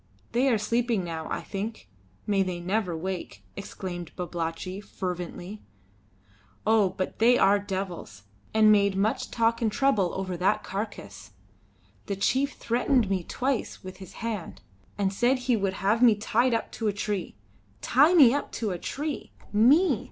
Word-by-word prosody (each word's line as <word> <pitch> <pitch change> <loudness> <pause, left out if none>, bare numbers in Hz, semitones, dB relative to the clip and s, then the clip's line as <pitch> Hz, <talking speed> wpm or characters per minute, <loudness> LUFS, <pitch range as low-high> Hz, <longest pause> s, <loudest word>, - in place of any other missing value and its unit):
"They 250 +4 +2
are 235 - +3
sleeping 230 -1 0
now, 165 -2 -5
I - - -2
think. 200 - -6 0.4
May 200 -2 +2
they 185 -2 -2
never 180 -1 -1
wake!" 170 - -5
exclaimed 175 -3 -6
Babalatchi, 175 +2 -4
fervently. 180 +1 -6 1.0
"Oh! 215 -3 +4
but 185 - -3
they 240 +2 +5
are 200 +1 +4
devils, 185 - -5 0.3
and 215 -1 +5
made 200 -2 +4
much 210 +3 0
talk 230 0 +1
and 220 -2 +1
trouble 205 -8 +2
over 190 -1 -3
that 190 +4 +1
carcase. 105 - -6 0.7
The 200 - -1
chief 265 +8 +1
threatened 235 -2 +1
me 185 -2 0
twice 260 +6 -2
with 185 0 -9
his 190 -1 -11
hand, 210 -7 -5 0.3
and 195 -1 0
said 245 +6 +2
he 250 -1 +1
would 195 -3 -1
have 205 +4 +1
me 235 -3 +7
tied 230 +4 +1
up 225 - -3
to 225 - -3
a 205 - +1
tree. 200 -1 -3 0.5
Tie 290 - +4
me 265 -8 +8
up 285 - -2
to 220 -4 -2
a 175 - -4
tree! 295 - -4 0.2
Me!" 215 +4 +5
205 Hz, 160 wpm, -27 LUFS, 185-230 Hz, 1.0 s, me